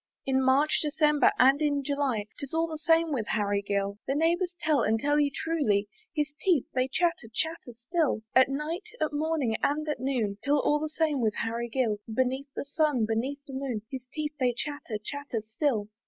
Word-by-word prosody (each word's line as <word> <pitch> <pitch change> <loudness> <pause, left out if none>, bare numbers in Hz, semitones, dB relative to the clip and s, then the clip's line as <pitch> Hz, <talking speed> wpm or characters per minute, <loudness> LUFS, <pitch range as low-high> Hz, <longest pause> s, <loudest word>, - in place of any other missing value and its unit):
In 265 0 +2
March, 275 +4 +3
December, 300 -1 +3
and 270 +3 +5
in 285 -2 +1
July, 275 -7 0
"Tis 280 +2 -6
all 325 0 +2
the 315 -2 -6
same 325 0 +3
with 235 -7 -1
Harry 205 -1 +1
Gill; 200 0 -2
The 270 - 0
neighbours 345 +3 +1
tell, 310 -4 +2
and 220 +1 +2
tell 290 +4 +2
you 290 -1 +3
truly, 270 -11 0 0.3
His 300 -1 -1
teeth 345 -9 +3
they 255 0 +1
chatter, 335 -2 0
chatter 320 0 -3 0.2
still. 315 -9 +1
At 260 +1 +6
night, 315 +9 -3
at 310 -1 0
morning, 295 -6 0
and 305 +2 0
at 300 -4 -2
noon, 235 -6 -1
'Tis 285 - +1
all 295 +1 +3
the 310 +1 -3
same 310 -3 0
with 215 -2 +1
Harry 230 +1 -2
Gill; 225 -4 0
Beneath 260 +4 -1
the - - -3
sun, 285 -5 +1
beneath 260 +6 -2
the 270 - -10
moon, 260 -5 -3
His 260 -2 -6
teeth 305 0 -3
they 250 -2 +2
chatter, 290 -7 -4
chatter 240 0 -5
still. 220 -1 0
280 Hz, 195 wpm, -28 LUFS, 235-305 Hz, 0.3 s, At